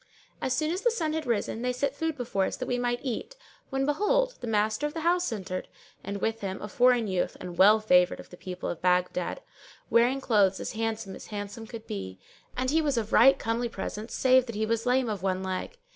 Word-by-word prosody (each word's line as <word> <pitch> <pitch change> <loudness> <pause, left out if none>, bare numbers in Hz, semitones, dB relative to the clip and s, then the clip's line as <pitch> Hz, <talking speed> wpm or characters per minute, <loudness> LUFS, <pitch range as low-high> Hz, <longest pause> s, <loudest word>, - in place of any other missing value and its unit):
As 260 - 0
soon 310 +4 0
as 365 +3 -2
the 485 - +4
sun 330 -9 -1
had 315 -3 -3
risen, 225 0 -1
they 250 0 0
set 265 +2 -1
food[FN#601] 320 +1 -2
before 230 -6 0
us - - -3
that 255 - -3
we 245 -1 -1
might 240 0 -1
eat 265 - -4 0.3
when 270 -1 0
behold, - - +2
the - - -5
master 215 +5 +1
of 295 - -9
the 325 - -3
house 350 0 +2
entered, 185 -4 -4 0.4
and 200 0 -4
with 225 0 -1
him 190 -1 -4
a - - -6
foreign 245 +2 +3
youth 185 -3 -1
and 180 - -6
a - - -7
well 205 +5 +6
favoured 180 -4 +3
of - - -12
the - - -9
people 180 0 -6
of 170 - -4
Baghdad, 180 - 0 0.5
wearing 245 +3 +4
clothes 205 -7 +3
as - - -4
handsome 225 -3 -3
as - - -11
handsome 210 +2 -6
could 225 -1 -9
be; 95 -2 -6 0.4
and 255 +1 0
he 320 +1 +3
was 285 -5 0
of 220 -1 -2
right 270 +4 +7
comely 235 0 -1
presence 210 +1 -5
save 260 -1 +4
that 230 - -6
he 215 +1 0
was 230 +2 -1
lame 250 0 +3
of 210 -4 -3
one 190 -1 -1
leg. 190 - -4
230 Hz, 235 wpm, -28 LUFS, 200-270 Hz, 0.5 s, right